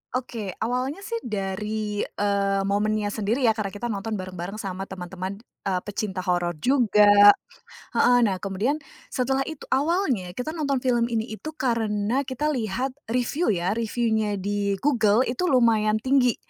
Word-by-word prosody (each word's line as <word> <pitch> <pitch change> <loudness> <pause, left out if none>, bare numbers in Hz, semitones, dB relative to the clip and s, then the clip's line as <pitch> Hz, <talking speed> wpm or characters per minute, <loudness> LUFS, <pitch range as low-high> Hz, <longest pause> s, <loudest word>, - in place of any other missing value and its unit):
Oke 230 -6 -4
awalnya 255 - -2
sih 465 +2 -3
dari, 210 - -3
eee, 200 -1 0
momennya 205 +1 0
sendiri 220 +5 -1
ya 230 - +6
karena 215 -2 -2
kita 235 +3 -3
nonton 210 +2 -3
bareng-bareng 185 0 -6
sama 195 -2 -5
teman-teman, 185 +1 -6 0.3
eee, 185 -2 0
pecinta 195 -3 -3
horor 175 -2 0
juga 205 -5 +6 0.6
heeh, 245 0 +5
nah 205 -5 +2
kemudian 200 +9 -1 0.3
setelah 265 +1 0
itu 315 -3 -7
awalnya 265 - +1
kita 280 +6 -3
nonton 280 -5 -1
film 240 -2 +2
ini 225 -1 -2
itu 220 +8 -7
karena 230 -1 0
kita 295 +4 -1
lihat 250 +2 -2 0.2
review 250 +8 0
ya, 180 -2 +1
review-nya 220 -2 0
di 200 +1 -1
Google 235 -4 +4
itu 255 +10 -1
lumayan 225 -5 +3
tinggi. 255 +1 +2
215 Hz, 145 wpm, -25 LUFS, 200-250 Hz, 0.6 s, ya